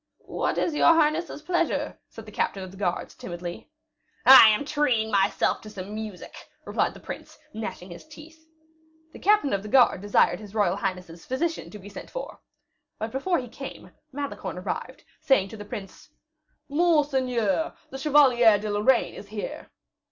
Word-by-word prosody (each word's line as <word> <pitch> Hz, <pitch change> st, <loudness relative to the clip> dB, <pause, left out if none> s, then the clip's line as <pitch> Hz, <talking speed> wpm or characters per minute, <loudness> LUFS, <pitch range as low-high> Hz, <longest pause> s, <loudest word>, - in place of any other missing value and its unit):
"What -, -, -2 dB
is 335 Hz, -, 0 dB
your 330 Hz, +2 st, +5 dB
highness's 310 Hz, 0 st, 0 dB
pleasure?" 345 Hz, 0 st, -1 dB
said 225 Hz, -, -11 dB
the 215 Hz, -, -11 dB
captain 195 Hz, -1 st, -2 dB
of 185 Hz, -, -9 dB
the -, -, -13 dB
guards, 180 Hz, -3 st, -2 dB
timidly. 175 Hz, 0 st, -8 dB, 0.6 s
"I 255 Hz, -3 st, +11 dB
am 215 Hz, +7 st, +1 dB
treating 265 Hz, -7 st, +1 dB
myself 200 Hz, -1 st, +1 dB
to 215 Hz, -, -10 dB
some 200 Hz, 0 st, -8 dB
music," 215 Hz, -3 st, -7 dB, 0.3 s
replied -, -, -1 dB
the -, -, -11 dB
prince, -, -, -9 dB, 0.2 s
gnashing 190 Hz, -4 st, -6 dB
his 175 Hz, -, -11 dB
teeth. 315 Hz, +1 st, -14 dB, 0.7 s
The -, -, -11 dB
captain 415 Hz, -, +3 dB
of 200 Hz, -, 0 dB
the 210 Hz, -, -8 dB
guards 245 Hz, -6 st, +4 dB
desired 205 Hz, -3 st, +2 dB
his 210 Hz, -1 st, -12 dB
royal 200 Hz, -3 st, +2 dB
highness's 180 Hz, -4 st, -5 dB
physician 325 Hz, +6 st, -2 dB
to 210 Hz, -, -10 dB
be 200 Hz, -1 st, -12 dB
sent 205 Hz, -, -10 dB
for. -, -, -7 dB, 0.6 s
But 220 Hz, +1 st, -4 dB
before 340 Hz, +8 st, 0 dB
he 250 Hz, -, -5 dB
came, 270 Hz, +4 st, -9 dB, 0.2 s
Malicorne 285 Hz, +1 st, -5 dB
arrived, -, -, -5 dB, 0.2 s
saying 195 Hz, -8 st, +3 dB
to 220 Hz, -, -9 dB
the 205 Hz, -, -8 dB
prince, 200 Hz, +6 st, -9 dB, 0.6 s
"Monseigneur, 285 Hz, -, +1 dB, 0.2 s
the 270 Hz, -, -6 dB
Chevalier 260 Hz, -7 st, +5 dB
de 210 Hz, +1 st, -4 dB
Lorraine 215 Hz, +5 st, +2 dB
is 200 Hz, -, -10 dB
here." 210 Hz, 0 st, -6 dB
225 Hz, 165 wpm, -26 LUFS, 200-295 Hz, 0.7 s, I